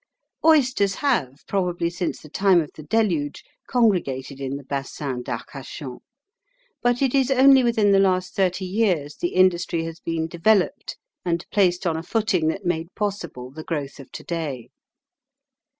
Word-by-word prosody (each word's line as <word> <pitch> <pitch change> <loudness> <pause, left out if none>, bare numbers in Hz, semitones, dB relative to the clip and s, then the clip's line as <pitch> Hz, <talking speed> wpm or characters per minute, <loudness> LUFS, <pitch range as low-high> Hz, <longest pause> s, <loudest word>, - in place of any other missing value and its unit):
Oysters 260 -11 +4
have, 150 - -1
probably 180 -3 0
since 175 -1 -3
the - - -12
time 190 +3 +3
of 155 - -3
the - - -10
Deluge, 160 -4 0 0.2
congregated 170 - +1
in 135 +1 -3
the 140 - -10
Basin 135 -1 -4
d'Arcachon; 130 +2 -7 0.8
but 245 +2 +2
it 265 - +1
is 270 -2 +3
only 270 0 +6
within 225 -4 +3
the 195 - +5
last 185 -1 +1
thirty 185 -1 0
years 180 -7 0
the 175 - -3
industry 180 -2 +3
has 165 0 -7
been 165 -1 -2
developed 190 - +1 0.3
and 170 -1 -1
placed 185 -3 +2
on 165 -2 +1
a - - -3
footing 190 -3 0
that 195 +5 -2
made 170 0 -2
possible 170 -12 -4
the 155 +3 -8
growth 145 -5 -4
of 135 - -12
today. 150 -8 -5
175 Hz, 150 wpm, -23 LUFS, 150-205 Hz, 0.8 s, only